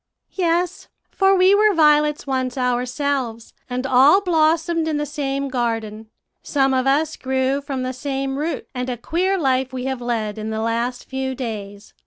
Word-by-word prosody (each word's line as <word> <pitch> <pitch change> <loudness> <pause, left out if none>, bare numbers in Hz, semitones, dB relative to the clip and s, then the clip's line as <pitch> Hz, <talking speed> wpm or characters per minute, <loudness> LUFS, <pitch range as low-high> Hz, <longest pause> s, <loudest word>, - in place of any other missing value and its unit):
"'Yes, 350 0 -1 0.2
for 390 0 +3
we 370 +1 +5
were 420 -1 +4
violets 300 -1 +3
once 260 -2 -2
ourselves, 250 -1 -2 0.2
and 250 +1 -3
all 270 +7 +6
blossomed 330 -2 +1
in 310 -2 0
the 295 - -1
same 280 -1 -3
garden; 225 -4 -3 0.3
some 270 -2 +1
of 260 0 +1
us 300 +3 +2
grew 265 +1 -1
from 275 -2 -4
the 255 0 -3
same 270 +1 -3
root, 320 +3 -3
and 250 0 -3
a 245 - -3
queer 365 - 0
life 265 -4 +1
we 255 -1 -5
have 265 -2 -3
led 220 -3 -2
in 215 +1 -4
the 220 0 -3
last 235 +2 -2
few 265 0 -3
days. 210 -5 -7
265 Hz, 170 wpm, -21 LUFS, 245-305 Hz, 0.3 s, all